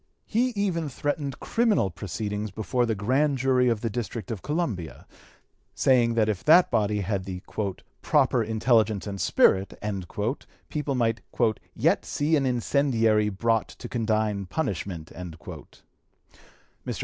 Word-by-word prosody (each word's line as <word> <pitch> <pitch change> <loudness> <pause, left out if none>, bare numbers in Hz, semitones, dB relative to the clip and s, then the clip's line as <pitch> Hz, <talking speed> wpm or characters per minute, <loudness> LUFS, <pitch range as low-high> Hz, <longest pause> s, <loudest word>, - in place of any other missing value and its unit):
He 235 +4 +1
even 175 -6 -1
threatened 145 0 -3
criminal 220 - +1
proceedings 105 +4 -4
before 115 +5 -1
the 110 - 0
grand 135 +8 +1
jury 125 -1 +3
of 115 -3 0
the 115 - -1
District 115 +1 -4
of 105 -5 -4
Columbia, 135 - -3 0.7
saying 120 -3 +3
that 110 -2 +3
if 105 -4 -2
that 175 +4 +6
body 105 -1 +1
had 100 -1 -2
the 90 -1 -6 0.6
"proper 125 - +3
intelligence 110 -1 +2
and 100 -3 -5
spirit" 95 +3 +3 0.9
people 150 -2 -2
might 115 -2 +1 0.5
"yet - - +2
see 150 +2 0
an 140 -3 +1
incendiary 115 -4 +2
brought 115 +2 0
to 120 - -10
condign 110 -4 -1
punishment." 90 - -3
Mr. 85 -4 -9
115 Hz, 125 wpm, -26 LUFS, 105-135 Hz, 0.9 s, that